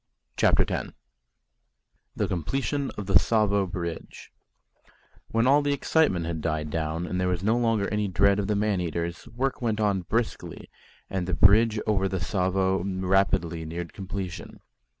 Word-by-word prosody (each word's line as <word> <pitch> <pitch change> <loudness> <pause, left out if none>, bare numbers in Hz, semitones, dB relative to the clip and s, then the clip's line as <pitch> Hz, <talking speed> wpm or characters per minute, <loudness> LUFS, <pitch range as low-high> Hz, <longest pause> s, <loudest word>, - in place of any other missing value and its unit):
CHAPTER - - +3
X - - -4 1.2
THE - - 0
COMPLETION 135 - -2
OF 105 - -4
THE 95 - +5
TSAVO 100 -3 +1
BRIDGE 85 -3 -6 1.0
When 115 +1 +1
all 140 +3 +5
the 145 0 0
excitement 140 - +1
had 80 -1 -3
died 75 -1 -2
down 80 +1 -2
and 90 +1 -2
there 90 - +1
was 90 0 -1
no 110 +3 +2
longer 115 -4 +1
any 105 -1 -1
dread 100 +2 +3
of 100 - -1
the 105 - +1
man 100 -2 0
eaters, 85 +2 -4
work 130 +4 -3
went 110 -3 -1
on 100 -3 +1
briskly, 115 +6 -3 0.4
and 95 -2 -3
the 90 - 0
bridge 110 +2 +5
over 95 -3 +1
the 95 - -2
Tsavo 95 0 0
rapidly 95 -3 0
neared 85 +2 -6
completion. 95 -2 -6
95 Hz, 155 wpm, -26 LUFS, 85-110 Hz, 1.2 s, THE